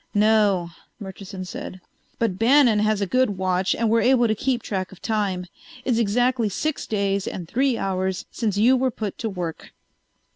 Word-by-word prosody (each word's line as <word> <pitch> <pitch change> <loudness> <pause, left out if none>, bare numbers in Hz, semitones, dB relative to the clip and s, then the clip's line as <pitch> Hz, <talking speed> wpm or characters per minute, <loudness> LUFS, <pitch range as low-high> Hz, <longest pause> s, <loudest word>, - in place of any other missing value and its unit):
"No," 205 -5 +3 0.3
Murchison 190 -1 -8
said. 185 0 -7 0.4
"But 210 -5 -1
Bannon 240 -2 +5
has 215 -1 +1
a - - +2
good 235 0 +1
watch 185 0 +1
and 230 - 0
we're 230 +1 +3
able 245 -2 +4
to 215 - +2
keep 245 +2 -1
track 185 -3 -3
of 190 - -14
time. 200 -5 -1 0.4
It's 245 -3 +1
exactly 235 +1 +1
six 310 +9 -3
days 200 -2 -1
and 175 -3 -5
three 260 +4 +1
hours 190 -1 -2
since 210 -4 -2
you 240 +5 +5
were 260 0 +1
put 215 -5 -5
to 225 - -2
work." 175 -5 -6
210 Hz, 175 wpm, -23 LUFS, 190-235 Hz, 0.4 s, Bannon